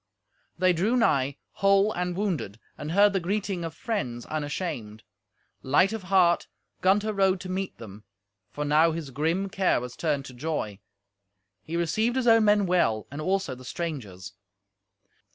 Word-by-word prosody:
They 185 +1 +3
drew 205 +9 +1
nigh, 140 - +2
whole 195 +2 +3
and 180 0 -2
wounded, 175 - -2 0.2
and 150 - -6
heard 200 +1 +5
the 195 - +1
greeting 190 0 -2
of 165 -1 -5
friends 125 - -3
unashamed. 145 - -4 0.6
Light 185 +10 +3
of 225 - -4
heart 185 -3 +3 0.3
Gunther 205 +3 +2
rode 195 -2 +2
to 185 - -7
meet 190 +1 -3
them, 105 -2 -11 0.5
for 150 - -4
now 155 +3 +4
his 155 -4 -5
grim 165 +8 0
care 190 -5 +1
was 125 0 -7
turned 145 -4 -1
to 130 - -10
joy. 125 -7 -3 0.8
He 165 +9 -4
received 215 +8 0
his 260 -2 0
own 225 -2 +6
men 205 -1 +4
well 170 -12 +1
and 145 +2 -5
also 190 -3 0
the 130 0 -11
strangers. 125 - -6
170 Hz, 155 wpm, -27 LUFS, 140-195 Hz, 0.8 s, own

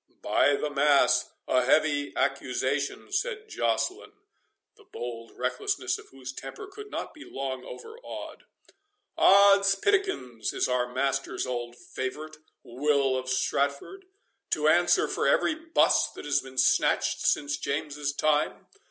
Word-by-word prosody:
"By 145 - +3
the 150 +1 -3
mass, 145 0 +3 0.2
a 125 - +3
heavy 145 +1 +2
accusation," 140 - -1
said 425 +2 -2
Joceline, 410 -1 -1 0.6
the 425 - -20
bold 120 - -7
recklessness 125 +1 -1
of - - -15
whose 130 -1 -9
temper 415 - -8
could 415 +2 -11
not - - -5
be 305 - -12
long 130 -1 -5
overawed; 455 - -9 0.7
"Odds 200 0 +6
pitlikins, 195 - -1
is - - +1
our 125 -1 0
master's 135 +1 -1
old 120 -1 -4
favourite, 150 +6 -6 0.3
Will 135 +1 +1
of 130 0 -3
Stratford, 140 - -1 0.4
to - - +1
answer - - +4
for - - -1
every - - +3
buss 325 +1 +2
that - - -9
has 145 -1 +1
been 130 0 -13
snatched 130 - +2
since 145 -1 0
James's 145 0 -2
time? 150 +1 0
140 Hz, 130 wpm, -27 LUFS, 130-200 Hz, 0.7 s, Odds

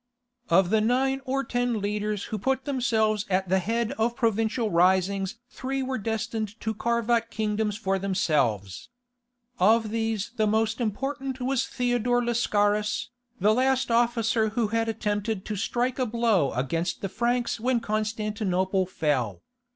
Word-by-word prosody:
Of 175 +2 +4
the 220 -1 +4
nine 265 +4 +1
or 270 +1 0
ten 245 -3 -1
leaders 210 0 -2
who 215 - -1
put 265 +5 0
themselves 220 -6 +1
at 190 -1 0
the 190 +1 +3
head 225 +4 -1
of 235 +2 +1
provincial 225 0 0
risings 190 +3 +2 0.2
three 270 +1 -3
were 260 -1 -2
destined 220 0 -3
to 220 - -1
carve 235 +1 -1
out 230 -1 +2
kingdoms 210 -1 -1
for 195 -3 -1
themselves. 145 - 0 0.7
Of 220 +2 +4
these 225 -1 -1
the 215 -1 +2
most 220 +2 +1
important 265 +4 -3
was 260 +1 0
Theodore 245 -1 +1
Lascaris, 210 -3 +1 0.3
the 210 +3 +4
last 260 +1 +1
officer 230 -1 +2
who 220 0 -1
had 225 +1 0
attempted 210 -2 -2
to 215 - -3
strike 240 +5 -1
a 255 - +1
blow 225 - +2
against 165 +8 -2
the 195 - -1
Franks 235 +4 -1
when 245 +1 +1
Constantinople 210 -4 -1
fell. 125 - -1
220 Hz, 145 wpm, -26 LUFS, 200-240 Hz, 0.7 s, Of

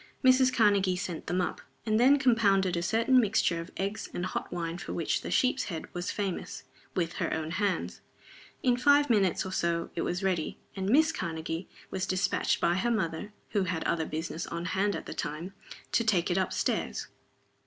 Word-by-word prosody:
Mrs. 255 0 +6
Karnegie 200 -6 +3
sent 175 -3 -5
them 180 +2 +1
up, 180 - -3 0.2
and 215 -1 +2
then 270 +4 +6
compounded 200 -8 +3
a 170 - 0
certain 230 +7 +3
mixture 200 -6 +2
of 165 - -9
eggs 200 +3 -3
and 175 - -2
hot - - -4
wine 170 0 -3
for - - -6
which 165 - 0
The - - -6
Sheep's 260 +1 +2
Head 165 -5 -6
was 175 0 -3
famous, 195 -4 -3 0.3
with 170 -3 0
her - - 0
own 160 0 -2
hands. 195 +1 -1 0.6
In 245 -2 +3
five 285 +1 +4
minutes 195 -6 +2
or 190 - -5
so 170 -2 -1
it 165 - -2
was 180 +2 -2
ready 180 -5 -1 0.2
and 190 0 -2
Miss 310 +6 +5
Karnegie 165 - -4 0.2
was 190 -1 -2
dispatched 185 +1 +1
by 170 - +2
her 240 +5 +1
mother 205 -3 -1 0.2
(who 205 -3 +1
had 170 -2 -2
other 160 -2 0
business 160 +1 -4
on 170 0 -4
hand 195 +2 0
at - - -6
the - - -6
time) 165 +4 -4 0.4
to 230 - +3
take 190 -5 +2
it 175 - +1
up 185 - 0
stairs. - - -1
190 Hz, 195 wpm, -29 LUFS, 170-220 Hz, 0.6 s, Mrs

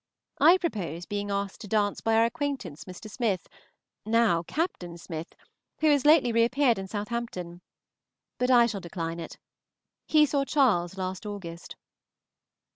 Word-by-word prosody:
I 350 +3 +7
propose 180 - -4
being 205 0 -3
asked 200 -1 -3
to 215 - -8
dance 205 -1 0
by 225 0 +1
our 225 +1 +5
acquaintance 255 - -4
Mr. 185 +3 -10
Smith, 215 -4 -2 0.6
now 220 -6 +3
Captain 175 - -3
Smith, 165 -1 -7 0.4
who 310 -1 +4
has 285 -1 +3
lately 295 -6 +6
reappeared 235 +1 +3
in 190 - -5
Southampton, 205 -5 -5 0.8
but 250 0 +1
I 240 -2 +7
shall 210 -4 -3
decline 165 -1 -5
it. 165 - -8 0.7
He 305 -1 +5
saw 280 -1 0
Charles 210 - +2
last 185 +2 -4
August. 175 -5 -8
210 Hz, 140 wpm, -27 LUFS, 180-250 Hz, 0.8 s, I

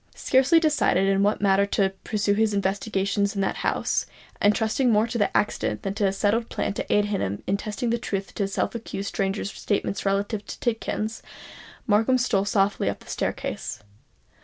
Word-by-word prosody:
Scarcely 270 +6 +4
decided 295 - +2
in 195 0 +2
what 205 +2 +2
manner 200 0 +3
to 195 -1 +1
pursue 205 -1 0
his 215 0 +1
investigation 200 0 0
in 200 - 0
that 195 - -1
house, - - 0 0.3
and 205 0 +4
trusting 235 +3 +1
more 215 0 +4
to 230 -3 0
accident 210 - -1
than 195 - -2
to 205 - 0
any 195 - +3
settled 210 +4 0
plan - - -2
to - - -4
aid 210 0 +4
him 105 - -2
in 195 - +1
testing 215 +3 -3
the 235 - 0
truth 200 -4 -3
of - - -18
the 200 - -1
self 195 - -1
accused 200 -4 -5
stranger's 195 0 -2
statement 200 -1 -2
relative 200 +2 0
to - - -7
Tidkins,—Markham 225 0 -2
stole 205 -6 +1
softly 200 -1 +1
up - - -5
the - - -17
staircase. - - -3
205 Hz, 180 wpm, -25 LUFS, 195-225 Hz, 0.3 s, Scarcely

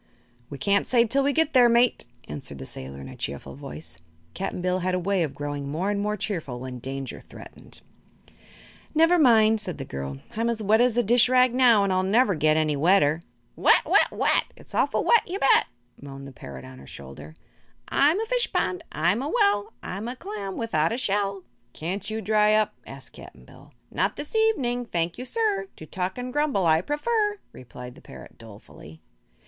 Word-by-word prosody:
"We 140 - -7
can't 200 +7 +1
say 240 -2 +4
till 270 +5 +1
we 280 +1 +2
get 320 +1 +1
there, 245 -3 +6
mate," 235 +1 +3 0.2
answered 75 -1 -4
the 65 - -8
sailor 65 +1 -6
in 70 - -9
a - - -10
cheerful 70 0 -5
voice. 80 +4 -9 0.3
Cap'n 190 0 -4
Bill 180 +1 0
had 185 0 -1
a - - 0
way 190 +1 0
of 155 -5 -2
growing 145 -1 -5
more 175 +8 -1
and 205 - -1
more 210 +1 -1
cheerful 170 - -4
when 125 0 -7
danger 135 +1 -6
threatened. - - -11 1.1
"Never 330 +3 +4
mind," 220 -5 +5
said 180 -6 -6
the 135 - -6
girl; 70 - -6 0.2
"I'm 230 +2 0
as 225 -2 -2
wet 215 +3 +4
as 245 -1 +2
a 240 - +3
dish 240 +3 +4
rag 255 -1 +4
now, 245 -5 +5
and 195 -1 +1
I'll 185 - +2
never 205 +3 +3
get 155 -1 +2
any 155 -1 +1
wetter." 160 0 +3 0.3
"Wet, - - +4
wet, - - +4
wet! - - +1
It's - - -17
awful - - +1
wet, 470 - +5
you 370 - -3
bet!" 275 - +4 0.3
moaned 140 0 -9
the - - -10
parrot 70 - -10
on 65 0 -12
her 65 - -14
shoulder. 70 +3 -11 0.5
"I'm 300 +7 +3
a 445 - -1
fish - - 0
pond, 365 -2 -1
I'm 175 +9 +1
a 285 - -3
well; 205 -6 +2
I'm 200 +5 -5
a 245 - -5
clam 205 -4 -6
without 165 -9 0
a 230 - -2
shell!" 200 -5 -1 0.3
"Can't 190 +6 -4
you 220 0 -3
dry 210 +1 +3
up?" 215 0 +1
asked - - -11
Cap'n - - -14
Bill. - - -17 0.2
"Not - - 0
this 295 +8 -8
evening, 260 - +1
thank 170 0 -2
you, 250 - -5
sir; 420 - -1
To 155 - -11
talk 185 +5 -4
and 250 0 -5
grumble 295 - +1
I 160 0 +4
prefer," 415 - -1
replied 125 0 -11
the - - -17
parrot, - - -13
dolefully. 100 -8 -14
200 Hz, 200 wpm, -25 LUFS, -, 1.1 s, there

